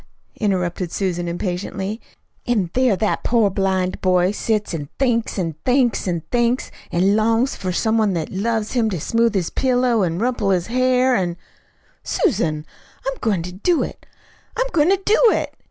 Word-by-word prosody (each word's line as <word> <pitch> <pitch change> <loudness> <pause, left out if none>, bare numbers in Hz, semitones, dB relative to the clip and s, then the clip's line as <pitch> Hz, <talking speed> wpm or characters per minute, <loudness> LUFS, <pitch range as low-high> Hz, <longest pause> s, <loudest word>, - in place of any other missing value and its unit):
interrupted 180 -4 -1
Susan 175 -3 -2
impatiently. 190 +4 -3 0.5
"An' 205 -8 +1
there 255 -5 +3
that 210 +2 -1
poor 225 -4 +2
blind 190 -1 -1
boy 180 0 +3
sets 210 -1 -1
an' 145 -3 -5
thinks 235 -5 0
an' 165 -4 -1
thinks 250 -5 +2
an' 170 -2 -1
thinks, 240 +1 +1 0.2
an' 190 +4 +3
longs 225 +4 +2
for 185 -1 -3
some 220 +5 +1
one 210 -3 +2
that 165 -3 -3
loves 220 +2 -1
him 235 -3 +1
to 185 -5 -3
smooth 230 +6 +1
his 180 -4 0
pillow 250 -3 +2
an' 170 -3 0
rumple 230 -1 0
his 180 -3 +1
hair, 255 +1 +2
an' 175 -4 -1 0.4
" - - -41 0.3
"Susan, 165 - 0 0.4
I'm - - -2
going 200 -8 0
to 180 - -6
do 310 - +1
it. - - -8 0.5
I'M - - +2
GOING 310 0 +3
TO 390 0 +3
DO 430 - +4
IT!" - - -2
210 Hz, 170 wpm, -21 LUFS, 180-240 Hz, 0.5 s, DO